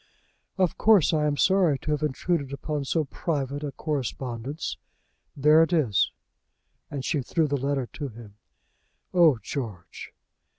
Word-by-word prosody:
"Of 185 -3 +1
course 210 -8 +5
I 150 -1 +2
am 145 -1 0
sorry 185 -6 +3
to 150 - -4
have 150 - 0
intruded 150 0 -1
upon 145 0 -3
so 155 +3 0
private 145 -1 -3
a 145 - -3
correspondence. 135 -1 -4 0.6
There 150 +3 +6
it 165 - +2
is." 130 - +2 0.8
And 140 -2 -5
she 145 - 0
threw 155 +5 0
the 145 - 0
letter 140 -1 -1
to 145 - -4
him. 115 -4 -12 0.8
"Oh, 165 -7 +5
George!" 105 -9 -6
145 Hz, 140 wpm, -26 LUFS, 135-160 Hz, 0.8 s, There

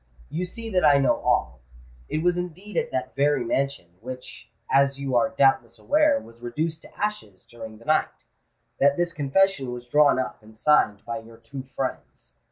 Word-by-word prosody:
"You 175 +4 -2
see 225 +5 -8
that 185 -2 +2
I 145 - +6
know 135 -1 +3
all. 60 +1 0 0.5
It 155 - -1
was 175 0 +3
indeed 180 +3 -6
at - - 0
that 130 0 -4
very 145 -1 +2
mansion—which, 125 -2 -4 0.2
as 140 0 +3
you 135 -2 -2
are 140 +3 +3
doubtless 130 -4 +3
aware, 300 -1 +3
was 115 - -16
reduced 155 +7 -3
to - - -17
ashes 205 - -4
during 110 -2 -10
the 115 - -18
night—that 145 -2 -1
this 175 -1 0
confession 145 -1 +1
was 125 0 -7
drawn 145 +2 +4
up 130 - -3
and 110 0 -17
signed 110 -7 +3
by 115 -1 -4
your 115 0 -14
two 115 +4 -8
friends. 125 - -5
140 Hz, 175 wpm, -25 LUFS, 120-160 Hz, 0.5 s, I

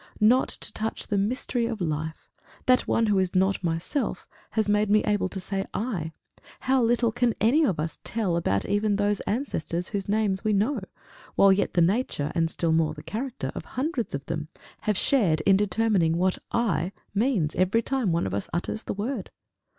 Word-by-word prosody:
Not 235 +5 +4
to - - -4
touch 220 +1 -3
the 205 - -1
mystery 235 +2 -1
of 230 -2 -4
life 160 -2 -4 0.3
that 255 0 +3
one 230 - +2
who 205 -3 +2
is 185 -1 -1
not 190 +1 +2
myself 170 - -2 0.3
has 220 -1 +2
made 210 0 +2
me 210 +1 +4
able 205 -2 +1
to 190 - -5
say 195 +1 -2
I, 195 -9 -2 0.5
how 265 0 +2
little 235 0 +2
can 245 0 +1
any 265 +9 +4
of 190 - +1
us 160 +1 -3
tell 210 -6 -1
about 100 - 0
even 205 0 +1
those 205 0 +1
ancestors 180 - -2
whose 200 -1 -3
names 205 -2 +1
we 215 -1 +1
know, 220 +7 +1 0.6
while 195 -1 +6
yet 195 - -1
the 175 - +4
nature, 185 - 0
and 165 -1 +1
still 165 0 0
more 160 -1 +2
the 150 - -10
character, 250 +3 -4
of - - -6
hundreds 265 - -1
of 140 0 -6
them, 155 -2 -4 0.4
have 210 -2 +2
shared 190 - +3
in 195 +4 +5
determining 195 -4 +2
what 185 +1 +1
I 195 -6 0 0.2
means 205 - +1
every 190 +6 +2
time 260 -8 0
one 165 - +1
of 95 - -3
us 100 - -3
utters 175 +6 -2
the - - -5
word! 230 +7 -3
205 Hz, 190 wpm, -26 LUFS, 170-230 Hz, 0.6 s, while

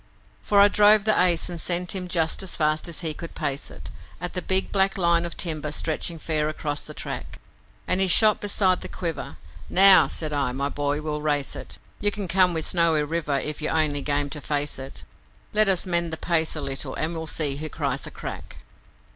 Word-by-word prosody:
For 205 - +2
I 200 - +8
drove 210 0 +5
the 215 -3 +3
Ace 175 -2 +2
and 175 -2 -5
sent 180 0 -1
him 185 -1 -4
just 165 -3 0
as 190 - -1
fast 155 +2 0
as 170 - -1
he 160 -3 -1
could 170 +2 -9
pace 140 0 -3
it, - - -11 0.3
At 175 +1 -5
the 180 - -3
big 190 +1 0
black 195 0 +1
line 170 -2 +2
of 170 - -8
timber 155 -4 -2
stretching 160 +2 -2
fair 155 -1 -2
across 150 -1 -4
the - - -10
track, - - -6 0.5
And 185 +1 +1
he 190 - +4
shot 215 +4 +5
beside 195 -3 +1
the - - -6
Quiver. 170 -4 -5 0.3
'Now,' 195 0 +8
said 155 -2 -4
I, 140 -3 -1
'my 140 +2 -2
boy, 145 +1 -2
we'll 150 -1 -4
race 145 -2 0
it. - - -9 0.2
You 205 - +2
can 205 -2 -4
come 180 -1 +3
with 160 - -1
Snowy 165 -3 +2
River 150 -2 -2
if 150 +3 -3
you're 155 +1 -1
only 145 -2 +1
game 145 0 -2
to 150 - -5
face 145 -1 -2
it, 135 +1 -8 0.5
Let 215 -1 +5
us 190 -1 +1
mend 170 -2 0
the 160 - -4
pace 165 -2 0
a - - -5
little 135 0 -4
and 160 +2 -2
we'll 160 -1 -5
see 145 -3 0
who 155 +1 -5
cries - - -3
a - - -10
crack.' - - -9
165 Hz, 215 wpm, -24 LUFS, 150-180 Hz, 0.5 s, I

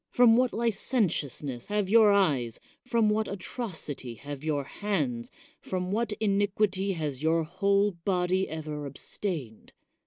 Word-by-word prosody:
From 240 -2 +6
what 250 +1 +3
licentiousness 175 - -1
have 205 -1 0
your 215 0 +6
eyes, 145 - +2 0.2
from 235 -3 +2
what 215 +1 +1
atrocity 180 - -5
have 140 +3 -8
your 150 -3 0
hands, 140 - -2 0.3
from 185 0 -3
what 220 +1 0
inquity 200 -1 +1
has 150 -6 -3
your 160 +1 +2
whole 200 +4 +2
body 180 +1 0
ever 150 -2 -5
abstained 140 - -5
185 Hz, 125 wpm, -28 LUFS, 150-210 Hz, 0.3 s, From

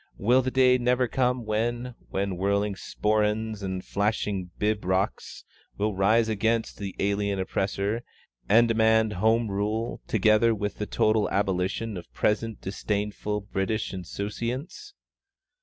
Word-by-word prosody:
Will 125 +6 +4
the 130 - -1
day 130 -1 +4
never 125 +1 +2
come 125 -1 0
when, 120 +3 -1 0.2
with 100 +1 -1
whirling 100 +3 0
sporrans 105 +1 -1
and 95 -1 -4
flashing 100 -3 -1
pibrochs 100 -3 -1 0.3
you 105 - 0
will 105 -2 -1
rise 110 +4 +3
against 110 +1 0
the 100 -2 -5
alien 100 0 0
oppressor, 100 +3 -1 0.5
and 115 +3 +6
demand 110 -1 +3
Home 110 +4 +2
Rule, 105 +4 -2
together 110 +2 +4
with 105 -1 -4
the 105 - -2
total 110 -1 +2
abolition 100 +2 -1
of 85 - -10
present 110 +1 0
disdainful 105 +1 -2
British 100 +2 -2
insouciance? 120 - -5
105 Hz, 125 wpm, -26 LUFS, 100-115 Hz, 0.5 s, and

